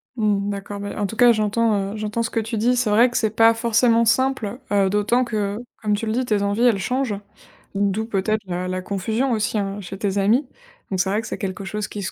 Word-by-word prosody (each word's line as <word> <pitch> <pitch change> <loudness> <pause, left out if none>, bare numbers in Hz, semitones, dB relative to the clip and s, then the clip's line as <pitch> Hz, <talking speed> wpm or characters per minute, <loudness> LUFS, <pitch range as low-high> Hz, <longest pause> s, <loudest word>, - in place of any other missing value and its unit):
Mmh, 205 -3 0
d'accord, 200 0 -5
bah, 205 +1 -5
en 205 - +1
tout 210 - -5
cas, 240 +1 +6
j'entends, 215 -2 +1
heu, - - -6
j'entends 215 +2 -2
ce 225 - -2
que - - -1
tu 225 +1 -3
dis. 240 +4 +2
C'est 245 -3 +1
vrai 230 +4 +5
que 245 - -2
c'est 220 - +1
pas 225 0 +6
forcément 230 0 +3
simple, 245 -1 +1
heu, 200 -1 +3
d'autant 210 +5 +2
que, 210 -3 -2 0.2
comme 210 -1 +1
tu 220 +2 -3
le 215 - 0
dis, 255 +2 0
tes 210 -4 +1
envies, 200 +3 0
elles 230 -5 +4
changent. 250 -1 -1 0.6
D'où 200 +2 0
peut-être 215 0 -1
la 180 0 -3
la 185 0 -3
confusion 220 +7 -1
aussi, 220 0 0
hein, 200 0 -3
chez 190 +1 -8
tes 200 -1 -1
amis. 230 +8 +2 0.4
Donc 190 -2 -2
c'est 190 - +1
vrai 210 +3 0
que 220 - -9
c'est - - -4
quelque 195 0 -5
chose 210 +1 -3
qui 205 - -6
se 175 - -4
215 Hz, 250 wpm, -22 LUFS, 200-230 Hz, 0.6 s, cas